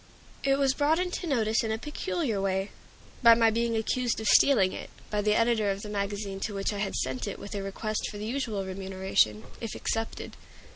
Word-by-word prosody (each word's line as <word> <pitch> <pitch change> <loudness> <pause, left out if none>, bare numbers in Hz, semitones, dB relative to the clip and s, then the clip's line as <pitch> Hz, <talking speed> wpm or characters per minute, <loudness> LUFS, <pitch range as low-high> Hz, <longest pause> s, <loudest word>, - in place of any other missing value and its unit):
It 275 0 +3
was 275 -1 +3
brought 295 +3 +2
into 360 0 -2
notice 225 -6 +1
in 220 - -1
a 220 - 0
peculiar 295 - -2
way, 195 0 -1 0.5
by 235 -2 +8
my 225 -1 +4
being 230 0 0
accused 240 +2 0
of 220 - -3
stealing 210 -9 +5
it, - - -7 0.2
by 210 -1 +1
the 210 0 +2
editor 230 -3 +2
of 195 +1 -2
the 210 - -6
magazine 200 -1 -3
to 205 +1 -3
which 195 +1 -1
I 205 - -4
had 200 -1 -2
sent 130 -1 -2
it - - -4
with 200 - -8
a 200 - -3
request 210 +2 -3
for 210 - -8
the 210 - -5
usual 225 -5 -2
remuneration, 190 - 0 0.2
if 230 -2 -4
accepted. 225 0 -3
215 Hz, 205 wpm, -28 LUFS, 195-235 Hz, 0.5 s, by